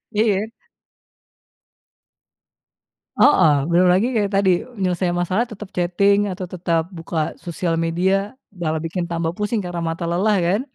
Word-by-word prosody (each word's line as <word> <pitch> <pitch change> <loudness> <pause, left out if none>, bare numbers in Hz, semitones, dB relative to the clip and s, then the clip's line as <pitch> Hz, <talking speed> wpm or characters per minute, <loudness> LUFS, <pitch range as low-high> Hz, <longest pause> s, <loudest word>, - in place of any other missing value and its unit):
Iya. 215 0 +1 2.7
Heeh, 160 - +6 0.2
belum 180 +2 +4
lagi 195 +6 +3
kayak 205 -2 +1
tadi 195 -1 +3 0.3
menyelesaikan 180 -1 0
masalah 185 +7 0
tetap 210 -2 -9
chatting 200 +3 +2
atau 185 0 -5
tetap 170 -2 -1
buka 165 -1 -3
sosial 170 0 -2
media 175 +4 +1 0.5
malah 160 -1 -1
bikin 170 +1 -3
tambah 165 -1 -1
pusing 210 +1 -1
karena 175 -1 -4
mata 170 +1 -4
lelah 200 +5 +2
kan? 200 +6 +2
180 Hz, 130 wpm, -21 LUFS, 170-200 Hz, 2.7 s, Heeh